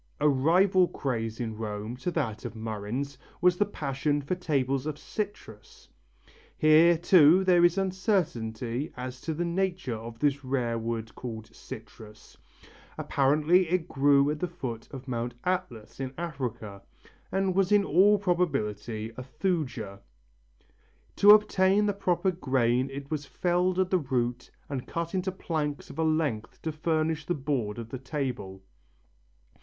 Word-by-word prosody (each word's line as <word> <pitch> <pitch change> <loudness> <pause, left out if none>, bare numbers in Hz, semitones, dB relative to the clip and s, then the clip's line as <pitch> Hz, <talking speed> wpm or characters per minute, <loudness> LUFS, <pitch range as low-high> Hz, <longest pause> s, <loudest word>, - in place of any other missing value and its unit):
A 150 - +3
rival 175 +7 +4
craze 115 -7 -3
in 115 -3 -3
Rome 105 +1 -5
to 130 - -3
that 120 -11 -2
of - - -6
murrhines 115 +5 -4 0.2
was 180 0 +4
the 205 - +2
passion 145 -4 -1
for 145 +5 -3
tables 140 -6 -1
of 150 -1 -3
citrus. 195 - -7 0.7
Here 160 +2 +6
too 175 +1 +6
there 180 -2 +4
is 175 +2 +4
uncertainty 150 - -1
as 125 0 -6
to 160 - -3
the 175 +3 -1
nature 180 -5 -1
of 115 +1 -7
this 145 +1 0
rare 125 -3 -1
wood 115 -1 -4
called 110 -2 -8
citrus. 110 -1 -12 0.6
Apparently 155 +6 +2
it 180 -1 0
grew 140 +1 +3
at 150 - -4
the 180 - -1
foot 125 -9 -6
of 135 -1 -9
Mount 120 -1 -3
Atlas 180 -14 -3
in 130 -1 -4
Africa, 125 - -5 0.5
and 190 -1 +1
was 195 +1 +1
in 205 -1 +5
all 195 +6 +5
probability 120 - -1
a - - -5
thuja. 130 - -3 1.2
To 205 - +6
obtain 210 -1 +6
the 205 - +1
proper 190 -1 +1
grain 130 -6 +1
it 140 +2 -8
was 145 -2 -3
felled 180 0 0
at 185 -1 +1
the 185 - +3
root 125 -4 -2 0.2
and 135 -3 -5
cut 170 +1 -4
into 190 0 -1
planks 155 -5 -3
of - - -10
a - - +2
length 155 -9 -1
to 160 - -1
furnish 155 0 -1
the 175 - 0
board 130 -7 -2
of 115 -1 -7
the 130 - -6
table. 125 -9 -4
145 Hz, 150 wpm, -28 LUFS, 120-175 Hz, 1.2 s, Here